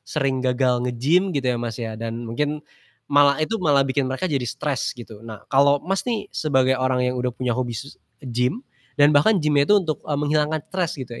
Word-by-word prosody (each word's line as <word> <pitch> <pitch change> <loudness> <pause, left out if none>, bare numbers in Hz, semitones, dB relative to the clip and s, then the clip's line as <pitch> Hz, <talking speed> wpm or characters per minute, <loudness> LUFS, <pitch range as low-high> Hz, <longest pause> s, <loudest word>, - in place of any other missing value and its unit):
sering 135 -3 -1
gagal 125 -1 +1
nge-gym 155 +11 +2
gitu 135 - -1
ya 120 - -2
Mas 115 -2 -4
ya, 115 -2 -5
dan 115 +1 -5
mungkin 150 +6 -3 0.4
malah 140 +1 +4
itu 155 +9 -2
malah 145 -5 +3
bikin 135 0 -1
mereka 130 +7 -3
jadi 130 -4 -1
stres 135 0 -3
gitu. 110 -3 -11
Nah 110 -3 -10
kalau 140 +1 +5
Mas 195 +6 -2
nih 225 -4 -1
sebagai 130 -3 +1
orang 130 -1 +1
yang 125 0 -1
udah 125 - 0
punya 125 -1 -1
hobi 120 -1 -3
s 140 +5 -9 0.2
nge-gym 125 - -1 0.3
dan 145 0 +5
bahkan 175 +9 +4
gym-nya 150 -3 +2
itu 210 - +6
untuk, 165 -6 -1
eee, 145 - 0
menghilangkan 150 +1 0
stres 180 -4 -1
gitu 130 -4 -8
135 Hz, 205 wpm, -22 LUFS, 125-150 Hz, 0.4 s, itu